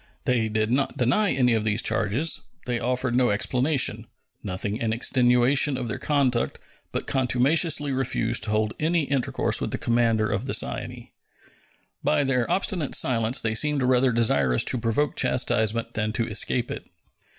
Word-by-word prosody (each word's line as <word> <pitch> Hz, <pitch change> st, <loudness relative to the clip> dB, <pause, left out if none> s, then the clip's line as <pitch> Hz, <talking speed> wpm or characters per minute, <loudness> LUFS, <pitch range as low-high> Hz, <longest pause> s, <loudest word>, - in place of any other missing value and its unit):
They 115 Hz, -3 st, +1 dB
did 110 Hz, +1 st, -1 dB
not 135 Hz, +2 st, 0 dB
deny 140 Hz, -, +2 dB
any 125 Hz, -3 st, +2 dB
of 110 Hz, -1 st, 0 dB
these 110 Hz, 0 st, 0 dB
charges; 120 Hz, +10 st, +1 dB, 0.2 s
they 120 Hz, -1 st, -2 dB
offered 125 Hz, +1 st, -1 dB
no 125 Hz, 0 st, +2 dB
explanation, 130 Hz, +7 st, 0 dB, 0.3 s
nothing 100 Hz, +2 st, -3 dB
in 115 Hz, -1 st, -1 dB
extenuation 125 Hz, +3 st, +2 dB
of 125 Hz, -2 st, -4 dB
their 115 Hz, -, -4 dB
conduct, 135 Hz, -5 st, 0 dB, 0.3 s
but -, -, -3 dB
contumaciously 140 Hz, +4 st, +1 dB
refused 120 Hz, -3 st, 0 dB
to -, -, -4 dB
hold 110 Hz, 0 st, 0 dB
any 165 Hz, +1 st, +1 dB
intercourse 140 Hz, -3 st, 0 dB
with -, -, -2 dB
the -, -, -3 dB
commander 115 Hz, -2 st, +1 dB
of 105 Hz, +5 st, -3 dB
the -, -, 0 dB
Cyane. -, -, -4 dB, 0.9 s
By 150 Hz, -1 st, +2 dB
their 125 Hz, -3 st, 0 dB
obstinate 180 Hz, -6 st, -1 dB
silence 115 Hz, 0 st, +1 dB
they 110 Hz, -1 st, -1 dB
seemed 145 Hz, +3 st, +1 dB
rather 125 Hz, 0 st, +3 dB
desirous 70 Hz, -, +1 dB
to 125 Hz, -, -1 dB
provoke 115 Hz, +6 st, -1 dB
chastisement 120 Hz, -3 st, 0 dB
than 110 Hz, 0 st, -2 dB
to 115 Hz, -1 st, -1 dB
escape 115 Hz, +3 st, -1 dB
it. -, -, -7 dB
125 Hz, 160 wpm, -24 LUFS, 110-135 Hz, 0.9 s, rather